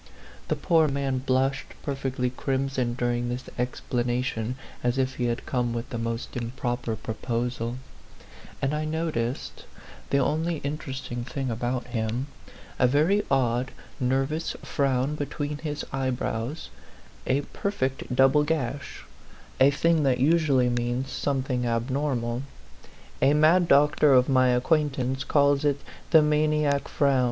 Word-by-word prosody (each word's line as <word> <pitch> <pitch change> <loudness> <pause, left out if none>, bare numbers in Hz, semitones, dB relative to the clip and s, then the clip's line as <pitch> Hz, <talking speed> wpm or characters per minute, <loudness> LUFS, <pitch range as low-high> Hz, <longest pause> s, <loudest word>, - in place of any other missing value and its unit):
The - - +1
poor 165 -3 +3
man 135 -2 -1
blushed 135 +1 0
perfectly 135 -3 -2
crimson 130 -2 -1
during 120 0 -1
this 125 +1 -3 0.2
explanation, 125 -1 -1 0.3
as 120 +1 +1
if 130 0 0
he 125 - 0
had 120 0 -2
come 120 -2 -1
with 115 +1 -4
the 120 - -3
most 115 +1 -4
improper 120 -1 -2
proposal; 115 +2 -3 0.9
and 135 +2 +1
I 150 0 -1
noticed 155 -6 -3 0.4
the 140 - +2
only 160 +5 +1
interesting 135 -4 -4
thing 135 0 -3
about 120 +2 -2
him 120 +1 -2 0.5
a 125 - +5
very 155 +10 +3
odd 125 -1 +1 0.3
nervous 135 +5 0
frown 135 0 0
between 145 0 -3
his 150 -1 -4
eyebrows, 130 +1 -2 0.6
a 135 +2 +2
per 200 - -4
fect 130 -8 -2
double 135 +3 +5
gash 145 -3 -3 0.6
a 135 - +7
thing 165 +3 +2
that 135 -3 +2
usually 140 -3 +3
means 120 +2 -1
something 130 -3 -1
abnormal; 120 0 -1 0.8
a 140 +2 +5
mad 165 +4 +5
doctor 150 0 +5
of 125 0 +5
my 130 -2 +4
acquaintance 130 0 +1
calls 140 -1 +3
it 145 -1 +2 0.3
the 160 -2 +7
maniac 150 -1 +2
frown. 140 -2 +2
135 Hz, 130 wpm, -26 LUFS, 125-145 Hz, 0.9 s, a